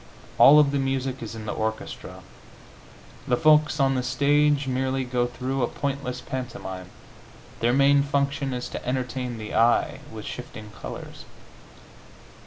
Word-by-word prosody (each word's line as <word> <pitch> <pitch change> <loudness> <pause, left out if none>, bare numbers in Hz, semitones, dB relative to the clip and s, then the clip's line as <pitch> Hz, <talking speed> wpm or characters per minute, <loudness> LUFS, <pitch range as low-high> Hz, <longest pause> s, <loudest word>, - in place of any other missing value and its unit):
All 150 - +9
of 145 -2 +5
the 140 - 0
music 135 -1 -2
is 115 -1 -6
in 110 -1 -7
the - - -3
orchestra; 110 0 -5 1.1
the 125 - +2
folks 155 0 +4
on 135 -1 +3
the 130 - 0
stage 145 +2 +2
merely 130 +1 0
go 125 -1 0
through 130 +2 -3
a 120 - +2
pointless 135 -2 -4
pantomime; 95 -8 -6 0.7
their 120 +1 +2
main 140 +2 +5
function 140 0 -1
is 125 -1 -4
to - - -6
entertain 125 -1 -3
the 110 -1 -7
eye 115 +1 +3
with 110 -1 -8
shifting 110 -4 -8
colors. - - -9
130 Hz, 145 wpm, -25 LUFS, 120-140 Hz, 1.1 s, All